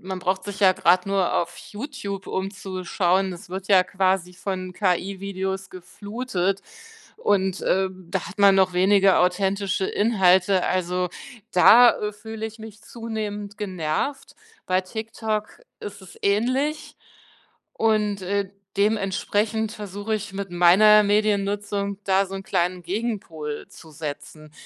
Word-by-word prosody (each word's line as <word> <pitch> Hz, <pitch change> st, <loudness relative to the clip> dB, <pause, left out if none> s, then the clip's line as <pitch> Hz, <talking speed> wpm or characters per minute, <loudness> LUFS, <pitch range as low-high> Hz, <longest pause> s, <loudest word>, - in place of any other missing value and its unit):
man 185 Hz, 0 st, -6 dB
braucht 185 Hz, +1 st, -1 dB
sich 205 Hz, 0 st, -7 dB
ja 190 Hz, -2 st, +6 dB
grad 180 Hz, +1 st, +3 dB
nur 195 Hz, -2 st, +1 dB
auf 170 Hz, -, -1 dB
YouTube 205 Hz, -5 st, -7 dB
umzuschauen. 190 Hz, -1 st, -1 dB
Es 175 Hz, 0 st, -11 dB
wird 190 Hz, +1 st, -5 dB
ja 195 Hz, -2 st, +6 dB
quasi 185 Hz, -1 st, 0 dB
von 185 Hz, 0 st, -5 dB
KI-Videos 190 Hz, 0 st, -2 dB
geflutet 195 Hz, 0 st, -3 dB, 0.5 s
und, 190 Hz, -, 0 dB
äh, 190 Hz, 0 st, +2 dB
da 185 Hz, 0 st, -5 dB
hat 205 Hz, -, -12 dB
man 200 Hz, -1 st, +6 dB
noch 190 Hz, -1 st, +3 dB
weniger 195 Hz, +1 st, +4 dB
authentische 190 Hz, +1 st, +1 dB
Inhalte. 190 Hz, -3 st, +3 dB
Also, 180 Hz, 0 st, 0 dB, 0.4 s
da, 235 Hz, +6 st, +8 dB
äh, 210 Hz, 0 st, -3 dB
fühle 220 Hz, +1 st, -6 dB
ich 220 Hz, +1 st, -11 dB
mich 215 Hz, -1 st, -11 dB
zunehmend 210 Hz, -3 st, -6 dB
genervt. 190 Hz, -, -3 dB, 0.3 s
Bei 185 Hz, 0 st, +1 dB
TikTok 220 Hz, +1 st, -4 dB, 0.2 s
ist 205 Hz, 0 st, -8 dB
es 190 Hz, -2 st, -14 dB
ähnlich 255 Hz, +9 st, 0 dB, 0.8 s
und, 210 Hz, -3 st, +1 dB
äh, 200 Hz, +1 st, -1 dB, 0.3 s
dementsprechend 210 Hz, +1 st, 0 dB
versuche 205 Hz, 0 st, -4 dB
ich 210 Hz, -1 st, -5 dB
mit 195 Hz, -1 st, -5 dB
meiner 205 Hz, +5 st, +6 dB
Mediennutzung 200 Hz, -1 st, 0 dB
da 195 Hz, 0 st, +3 dB
so 195 Hz, -, -8 dB
'n 195 Hz, -, -8 dB
kleinen 180 Hz, -1 st, -1 dB
Gegenpol 175 Hz, -7 st, -4 dB
zu 160 Hz, -, -15 dB
setzen. 155 Hz, 0 st, -8 dB
195 Hz, 130 wpm, -24 LUFS, 185-210 Hz, 0.8 s, da